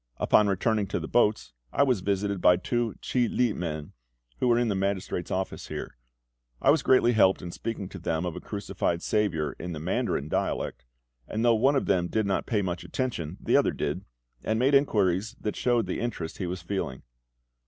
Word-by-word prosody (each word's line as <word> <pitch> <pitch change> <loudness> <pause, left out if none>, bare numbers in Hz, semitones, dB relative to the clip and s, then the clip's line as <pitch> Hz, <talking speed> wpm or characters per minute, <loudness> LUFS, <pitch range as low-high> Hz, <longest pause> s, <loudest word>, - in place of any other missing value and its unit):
Upon 105 - +4
returning 100 +2 +1
to 95 - -2
the 80 - -5
boats, 105 - +2 0.2
I - - +3
was 130 -6 +2
visited 100 0 -1
by 90 - +6
two 120 +4 -1
CHIH 125 -3 +1
LI 125 -3 +1
men, 80 -4 -5 0.5
who 125 - +3
are 120 - +4
in 120 0 +2
the 105 - +1
magistrate's 95 -2 -2
office 95 0 -3
here. - - -6 0.6
I - - +5
was 155 -1 +3
greatly 130 -3 +4
helped 95 -5 +4
in 85 - -5
speaking 105 0 -4
to 95 - -8
them 80 0 -1
of 85 - -3
a - - -5
crucified 100 -4 -2
SAVIOUR 80 -9 0
in 90 0 -5
the 75 - -5
Mandarin 90 - -1
dialect; 65 - -2 0.4
and 110 +2 -1
though 120 - +6
one 130 +6 +3
of 135 - +1
them 90 -1 +2
did 110 +3 0
not 95 -1 -1
pay 105 -4 +1
much 90 -1 -3
attention, 95 - -3
the - - +1
other - - +4
did, - - -3 0.4
and 110 - 0
made 130 +4 +3
inquiries 105 -6 +2
that 105 - -3
showed 120 -2 +1
the - - -3
interest 105 -9 -4
he 95 - -2
was 90 -1 -5
feeling. 85 -8 -3
100 Hz, 200 wpm, -27 LUFS, 90-115 Hz, 0.6 s, by